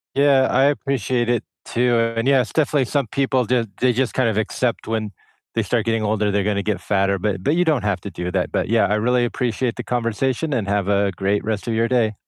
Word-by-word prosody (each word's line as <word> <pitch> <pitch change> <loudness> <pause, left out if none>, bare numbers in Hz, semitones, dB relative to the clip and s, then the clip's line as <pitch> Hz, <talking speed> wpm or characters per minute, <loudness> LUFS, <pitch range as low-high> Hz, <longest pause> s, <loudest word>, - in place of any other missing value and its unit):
Yeah, 140 -1 +4
I 135 - +4
appreciate 135 -4 0
it 120 -3 +1 0.2
too, 120 0 +1 0.2
and 115 +3 -1
yeah, 135 -2 +5
it's 120 - -6
definitely 145 -4 +2
some 140 -1 -1
people 130 +1 0
just 115 -1 0
they 125 -1 +3
just 130 +1 0
kind 130 -3 +2
of 110 - -2
accept 115 +2 -1
when 110 -2 -2 0.4
they - - +1
start - - -1
getting 115 -1 0
older, 105 0 0
they're 100 0 +1
gonna 100 0 0
get 105 0 -2
fatter, 100 -1 0
but 95 -1 -2
but 150 +9 +2
you 180 - +2
don't 150 -8 +1
have 100 -3 0
to 100 - -7
do 90 +1 -4
that, 90 -1 -1
but - - -1
yeah, 115 -1 +3
I 105 - +1
really 120 +3 +2
appreciate 120 0 -2
the - - -5
conversation, 125 +5 -1
and 110 -6 -1
have 100 -1 0
a 100 -1 +2
great 100 +1 0
rest 110 -1 -3
of 115 - 0
your 115 +1 +1
day. 115 -3 +1
115 Hz, 240 wpm, -21 LUFS, 105-130 Hz, 0.4 s, yeah